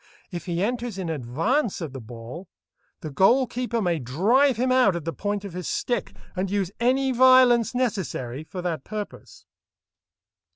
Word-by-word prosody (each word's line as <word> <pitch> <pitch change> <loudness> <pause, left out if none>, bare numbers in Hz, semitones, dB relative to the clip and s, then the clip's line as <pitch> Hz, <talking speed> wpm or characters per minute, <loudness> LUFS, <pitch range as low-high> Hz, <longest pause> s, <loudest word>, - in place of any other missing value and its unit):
If 175 -2 -6
he 175 +1 -1
enters 235 -1 -2
in 180 -4 -3
advance 165 - -1
of 160 -6 -6
the 135 - -7
ball, 120 - -9 0.5
the 155 - -6
goal 230 - +4
keeper 240 -1 -3
may 170 -3 0
drive 215 - +2
him 255 +2 +1
out 250 -8 +4
at 170 -3 -5
the 165 - -2
point 205 0 -3
of 195 - -7
his 180 -1 -4
stick, 245 - -2 0.2
and 185 +1 -1
use 195 -2 -1
any 260 +3 +2
violence 255 -2 +5
necessary 180 - -2
for 180 +3 -7
that 165 -6 -2
purpose. 210 -1 -8
195 Hz, 165 wpm, -25 LUFS, 165-245 Hz, 0.5 s, violence